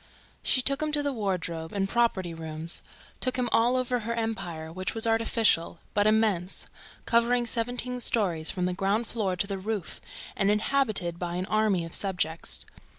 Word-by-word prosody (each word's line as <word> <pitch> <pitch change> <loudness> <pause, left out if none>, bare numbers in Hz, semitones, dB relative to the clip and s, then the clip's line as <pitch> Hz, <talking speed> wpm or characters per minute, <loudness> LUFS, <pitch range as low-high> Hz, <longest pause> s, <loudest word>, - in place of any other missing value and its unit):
She 255 - +1
took 275 +2 +3
him 305 0 0
to 295 -1 +2
the 285 -1 0
wardrobe 180 -7 -2
and 195 -1 0
property 195 -6 +1
rooms, 160 0 -2 0.4
took 255 - -1
him 250 -1 0
all 240 +2 +4
over 255 -1 +1
her 230 +1 -3
empire, 180 -8 -3
which 185 +3 -3
was 225 - +4
artificial, 225 -7 +2 0.2
but 205 0 +3
immense, 215 -4 +1 0.4
covering 240 +1 +3
seventeen 245 +2 -1
stories 180 -10 +3
from 180 -1 -1
the 180 - 0
ground 200 +5 0
floor 205 -5 -1
to 180 - -1
the 195 -1 -4
roof 205 -2 -4 0.3
and 195 - +2
inhabited 210 -6 +1
by 175 -1 -3
an 180 +1 -2
army 210 -5 +1
of 165 - -9
subjects. 180 -5 -1
210 Hz, 170 wpm, -28 LUFS, 180-235 Hz, 0.4 s, all